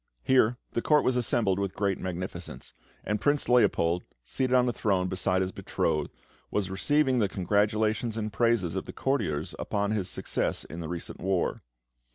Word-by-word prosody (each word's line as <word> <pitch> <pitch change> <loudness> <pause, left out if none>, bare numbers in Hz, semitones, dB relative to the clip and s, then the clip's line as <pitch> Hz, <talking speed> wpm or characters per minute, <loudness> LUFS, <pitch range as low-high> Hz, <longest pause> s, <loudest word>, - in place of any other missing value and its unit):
Here 125 -2 +4
the 115 - -1
Court 150 +3 +4
was 130 - +2
assembled 115 -5 +1
with 100 -2 -2
great 100 -2 0
magnificence, 90 -1 -6 0.3
and 105 +1 -2
Prince 145 0 +2
Leopold, 90 -8 +3 0.2
seated 130 - 0
on 125 0 +4
a 120 - 0
throne 95 -5 +1
beside 95 0 +1
his 95 - -3
betrothed, 75 -4 -1 0.4
was 95 -2 -1
receiving 135 +6 +2
the 105 -4 +2
congratulations 105 +4 +1
and 110 -1 -3
praises 115 -8 +2
of - - -3
the - - -8
courtiers 135 - -1
upon 100 0 -1
his 100 -4 -1
success - - -1
in 80 - -8
the 80 -2 -5
recent 85 -1 -5
war. 95 -1 0
105 Hz, 170 wpm, -28 LUFS, 90-120 Hz, 0.4 s, Here